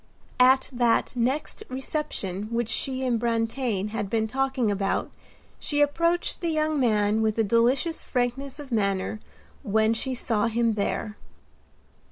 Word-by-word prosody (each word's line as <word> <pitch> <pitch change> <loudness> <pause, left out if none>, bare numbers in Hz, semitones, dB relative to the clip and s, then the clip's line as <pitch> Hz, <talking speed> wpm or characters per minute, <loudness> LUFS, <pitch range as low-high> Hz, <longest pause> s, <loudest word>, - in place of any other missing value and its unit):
At 260 +1 +5
that 240 +1 +2
next 255 +5 -1
reception 255 - -3
which 235 -1 -1
she 260 -1 -1
and 240 -3 +1
Brantain 225 -2 -1
had 210 -2 -3
been 220 0 +1
talking 260 -1 0
about 195 -1 -1 0.5
she 290 - -1
approached 335 +6 +1
the 340 - 0
young 310 -1 +1
man 215 -3 +2
with 220 0 +1
a 225 - +3
delicious 240 - +2
frankness 255 +3 -2
of 290 -3 -10
manner 200 -1 0 0.4
when 220 +2 +2
she 255 +3 -2
saw 225 -2 0
him 230 0 +1
there. 210 +1 -2
235 Hz, 140 wpm, -26 LUFS, 220-265 Hz, 0.5 s, At